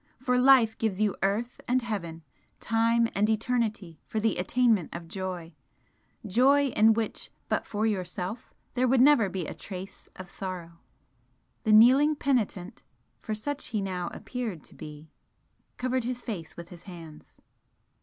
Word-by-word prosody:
for 250 0 +1
life 250 -4 +6
gives 210 -4 -1
you 215 -2 +1
earth 215 +5 -1
and 250 0 +1
heaven, 170 -8 -4 0.4
time 230 +1 +2
and 210 +2 +2
eternity 220 - -1
for 220 - -2
the 220 -2 +1
attainment 220 -1 +2
of 170 -1 -7
joy 180 -2 -5 0.7
joy, 270 +7 +4
in 220 -2 +5
which, 225 0 -3 0.2
but - - -1
for 215 +1 -1
Yourself, 190 +2 -3 0.2
there 255 0 +2
would 260 +1 +3
never 255 -6 +5
be 180 -2 -4
a - - -5
trace 190 0 -9
of 185 - -9
sorrow!" 175 -3 -7 0.9
The 215 - +3
kneeling 260 +8 +7
penitent 230 -8 -1 0.4
for 220 - -4
such 285 +7 -4
he 220 - -2
now 185 -3 -3
appeared 230 - -5
to - - -15
be 150 0 -11 0.7
covered 255 0 -1
his 245 0 -4
face 175 -9 -6
with 170 0 -9
his 175 -1 -13
hands. 165 -4 -12
215 Hz, 150 wpm, -28 LUFS, 180-245 Hz, 0.9 s, kneeling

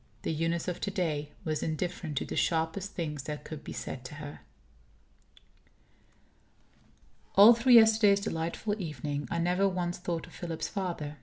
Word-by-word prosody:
The - - -1
Eunice 165 +2 -1
of 180 - -3
to - - -1
day 155 -6 -2 0.2
was 155 -2 -1
indifferent 160 -1 -3
to - - 0
the - - -5
sharpest 165 +4 0
things 150 -4 -3
that 150 -1 -5
could 155 -2 -8
be - - -8
said 130 - -6
to 140 - -8
her........ 145 -1 -8 3.0
All 205 +4 +10
through 240 +2 +3
yesterday's 220 -3 +7
delightful 200 +3 -2
evening, 145 -3 -4
I - - -2
never 180 +3 +2
once 175 -2 -2
thought 175 -2 -3
of - - -16
Philip's 170 -2 -4
father. 170 -6 -4
170 Hz, 155 wpm, -30 LUFS, 155-195 Hz, 3.0 s, All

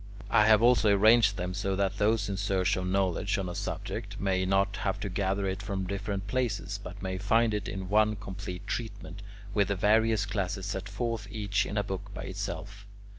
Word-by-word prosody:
I 105 - +5
have 110 0 +6
also 120 -3 +5
arranged 105 0 +5
them 90 +1 -3
so 95 0 -1
that 100 0 -1
those 105 0 +2
in 100 - -2
search 95 -2 +1
of 90 0 -2
knowledge 95 +1 +1
on 95 -2 -2
a 90 - -4
subject - - -5
may 95 -1 +1
not 95 +1 +2
have 95 0 -1
to 100 - -3
gather 100 +1 -1
it 95 +1 -2
from 100 -2 -3
different 100 +1 -3
places, 105 -4 -2
but 95 +2 -9
may 95 0 -3
find 110 +3 +3
it 105 -1 -2
in 95 -1 -5
one 105 +2 +3
complete 95 -3 -7
treatment, 100 -4 -5 0.3
with 100 -1 +3
the 100 - 0
various 110 +2 +3
classes 100 -2 -2
set 95 -1 -4
forth 115 -4 -3
each 105 -1 -1
in 105 - -4
a 105 - +2
book 100 +1 -5
by - - -5
itself. 100 +1 -6
100 Hz, 200 wpm, -29 LUFS, 95-105 Hz, 0.3 s, have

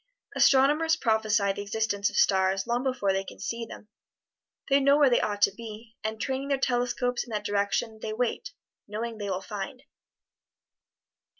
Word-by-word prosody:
Astronomers 295 +4 +4
prophesy 220 -5 +1
the 200 - -5
existence 205 -1 -1
of - - -10
stars 190 0 +3
long 240 +1 0
before 255 -7 0
they 195 0 -1
can - - -11
see 230 0 -4
them. 210 - -11 0.8
They 275 0 +4
know 280 +1 +4
where 285 -3 +5
they 240 - +4
ought 205 -1 -1
to - - +4
be, 225 0 -10
and 220 0 -3
training 265 +2 -2
their 280 -1 +1
telescopes 245 -1 0
in - - -15
that 210 -2 -3
direction 205 +2 -1
they 220 - -4
wait, 245 +8 -2 0.4
knowing 220 +2 -5
they 205 -1 -3
will 190 0 -2
find. 205 +6 -6
220 Hz, 170 wpm, -27 LUFS, 205-255 Hz, 0.8 s, where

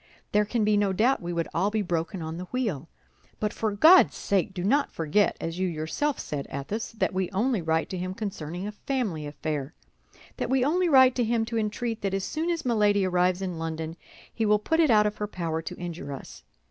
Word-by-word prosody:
"There 210 0 +3
can 225 +1 0
be 210 0 +3
no 200 -2 +2
doubt 235 +8 +2
we 175 0 -4
would 170 -1 -1
all 190 +4 +1
be 215 0 -1
broken 175 0 -2
on 160 +1 -5
the 180 - -5
wheel; 185 - -3 0.5
but 210 -1 -1
for 220 -1 -1
God's 320 - +7
sake, 200 0 0
do 180 -2 -5
not 280 +9 +2
forget, 165 +6 +1
as 165 +2 -4
you 185 - +1
yourself 170 - -2
said, 145 -2 -4
Athos, 175 +13 -4
that 220 - -1
we 185 -1 -1
only 220 +2 0
write 160 0 0
to 185 - -4
him 185 +1 -4
concerning 185 -4 -5
a 210 - -3
family 210 - -3
affair; 145 0 -4 0.6
that - - -2
we 260 -1 +2
only 350 +4 +2
write 260 -3 +7
to 245 - +2
him 225 0 +1
to 230 0 -2
entreat 225 +1 -2
that 195 -1 -1
as 195 - -2
soon 320 - -2
as 335 -4 -2
Milady 210 -4 +3
arrives 180 +1 +1
in 180 -3 -4
London 160 0 -4 0.4
he 225 - -1
will 210 -1 +4
put 320 +10 0
it 320 -3 +5
out 210 -2 +5
of 210 0 -1
her 210 - -2
power 165 -5 -3
to - - -7
injure 170 -5 -6
us. 135 - -10
200 Hz, 225 wpm, -27 LUFS, 170-225 Hz, 0.6 s, God's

